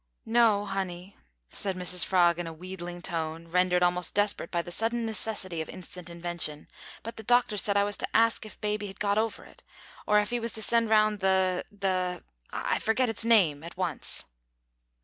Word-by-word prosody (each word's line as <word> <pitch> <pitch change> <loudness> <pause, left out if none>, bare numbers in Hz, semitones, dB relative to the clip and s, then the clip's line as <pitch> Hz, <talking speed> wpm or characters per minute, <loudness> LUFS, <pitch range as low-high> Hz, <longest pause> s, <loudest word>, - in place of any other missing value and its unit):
"No, 225 -3 +4
honey," 190 -1 -4 0.4
said 195 -2 -2
Mrs 180 -1 +1
Frog 175 -2 +3
in 175 - -3
a 165 - -6
wheedling 175 0 -7
tone, 165 -1 -3
rendered 180 +1 +3
almost 180 0 +1
desperate 205 -4 +1
by 170 -1 -1
the 175 - -8
sudden 230 +4 -1
necessity 200 -6 -2
for - - -14
instant 180 -1 -7
invention, 170 -3 -2 0.4
"but 230 - -7
the - - -6
doctor 240 -1 +3
said 200 0 +2
I 200 - +4
was 205 0 -2
to - - -2
ask 230 0 +3
if 215 - -11
baby 210 -1 -1
had 195 - -10
got 205 0 +2
over 225 0 -2
it, - - -17 0.5
or 210 0 +5
if 210 +3 -2
'e 240 - +1
was 230 0 -3
to 220 - -3
send 230 0 +3
round 215 -1 +4
the 190 -1 +2
the 185 -3 -1 0.3
I - - -1
forget 240 +3 +1
its 225 0 -3
name 185 -11 +4
at 170 +1 -9
once." 180 -4 -3
190 Hz, 190 wpm, -28 LUFS, 175-215 Hz, 0.5 s, or